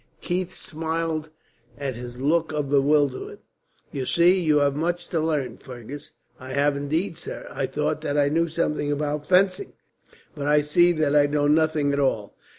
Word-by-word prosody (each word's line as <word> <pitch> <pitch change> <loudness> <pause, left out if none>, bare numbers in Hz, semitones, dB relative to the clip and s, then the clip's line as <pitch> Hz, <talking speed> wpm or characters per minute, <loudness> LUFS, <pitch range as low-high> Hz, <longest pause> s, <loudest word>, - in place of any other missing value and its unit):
Keith 180 +1 -3
smiled 160 -1 -3 0.5
at 140 -2 -3
his 120 +1 -8
look 160 +4 +1
of 150 -2 -2
bewilderment. 145 -1 +1 0.5
"You 130 -2 -4
see, 175 +2 +4
you 155 -3 +3
have 140 -1 +2
much 175 +3 -2
to 165 - 0
learn, 150 -7 -1
Fergus." 130 +3 -9 0.3
"I 130 0 -8
have 140 +1 +2
indeed, 155 +5 -2
sir. - - -7
I - - -2
thought - - -2
that 145 - -2
I 145 -1 +4
knew 165 +3 +1
something 150 -2 -1
about 150 0 -2
fencing, 190 - +2 0.6
but 145 -3 -4
I 150 0 +4
see 175 +4 +4
that 155 -3 +1
I 145 -1 +5
know 145 0 0
nothing 150 -1 +2
at 140 - 0
all." 110 -7 -1
150 Hz, 170 wpm, -24 LUFS, 140-165 Hz, 0.6 s, I